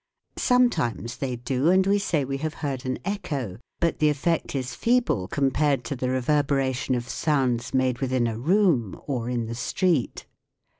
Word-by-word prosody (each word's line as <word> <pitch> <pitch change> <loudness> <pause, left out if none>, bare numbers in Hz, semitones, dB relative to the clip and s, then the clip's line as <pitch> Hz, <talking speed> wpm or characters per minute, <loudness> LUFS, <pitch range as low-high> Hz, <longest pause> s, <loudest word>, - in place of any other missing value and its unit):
Sometimes 165 - +1
they 130 -2 -2
do, 125 +5 0
and 185 +1 +4
we 200 +1 +3
say 160 -8 0
we 135 +1 -3
have 155 +2 -4
heard 135 -2 -3
an 130 - -1
echo. 140 - -3 0.2
But 170 -2 0
the 150 - +4
effect 150 +2 -1
is 130 -2 -3
feeble 230 - +1
compared 140 0 +1
to 140 - -4
the 125 0 -2
reverberation 135 -1 +1
of 120 0 -3
sounds 130 -5 0
made 130 -2 +1
within 130 -2 +1
a 115 -1 -1
room 160 - +2
or 125 -4 -2
in 120 -2 -1
the 115 - -5
street. 140 +4 0
135 Hz, 165 wpm, -25 LUFS, 125-155 Hz, 0.2 s, and